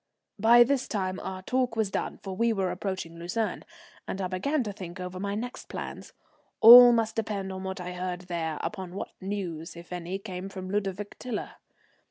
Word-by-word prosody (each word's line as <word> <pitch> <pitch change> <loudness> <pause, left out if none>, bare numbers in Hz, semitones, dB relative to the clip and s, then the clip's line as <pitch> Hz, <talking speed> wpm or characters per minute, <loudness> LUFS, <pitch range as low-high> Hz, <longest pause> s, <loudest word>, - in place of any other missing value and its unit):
By 235 +3 +8
this 265 +1 0
time 185 -3 -2
our 185 0 -6
talk 250 +2 0
was 220 -3 0
done, - - -3
for 190 -1 -5
we 230 +3 +2
were 195 -4 0
approaching 185 -3 -4
Lucerne, 180 +6 -2 0.4
and 190 - -4
I 190 - -1
began 245 +11 0
to 210 -3 -5
think 185 -2 -8
over 180 0 -6
my 200 +1 -2
next 245 +4 -6
plans. - - -7 0.5
All 245 +2 +11
must 225 -2 +1
depend 200 -4 -3
on 190 0 -6
what 190 0 -4
I 180 0 -5
heard 180 0 -4
there 170 -3 -3
upon 185 -2 -5
what - - -5
news, 180 -5 -4
if 170 +1 -10
any, 180 +2 -4
came 195 -2 -6
from 185 -1 -7
Ludovic 200 0 -3
Tiler. 245 -4 -4
190 Hz, 190 wpm, -28 LUFS, 180-220 Hz, 0.5 s, All